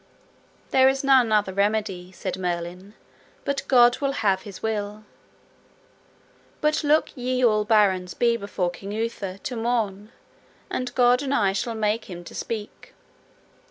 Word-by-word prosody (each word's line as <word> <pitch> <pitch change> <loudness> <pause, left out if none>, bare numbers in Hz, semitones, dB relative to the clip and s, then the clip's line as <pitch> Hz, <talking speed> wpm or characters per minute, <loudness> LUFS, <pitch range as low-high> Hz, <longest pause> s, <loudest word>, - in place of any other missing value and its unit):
There 265 0 +6
is 270 +1 -1
none 260 -4 +4
other 210 -3 +2
remedy, 200 -3 -1
said 185 0 -5
Merlin, 180 +3 -4 0.5
but 280 0 -1
God 245 -2 +5
will 275 -1 0
have 195 -7 +1
his 200 -2 -11
will. 210 -1 -3 1.6
But 305 +1 +1
look 300 +1 +2
ye 255 0 0
all 215 -2 +3
barons 195 -5 +2
be 235 -1 +2
before 200 -5 -2
King 195 +2 -8
Uther 210 -4 -3
to 245 +5 -6
morn, 225 -3 -2 0.6
and 255 -1 -2
God 245 0 +4
and 280 -1 -1
I 195 -6 +2
shall 225 +4 -2
make 215 +1 0
him 175 -2 -9
to - - -11
speak. 215 -2 -6
215 Hz, 145 wpm, -24 LUFS, 195-245 Hz, 1.6 s, There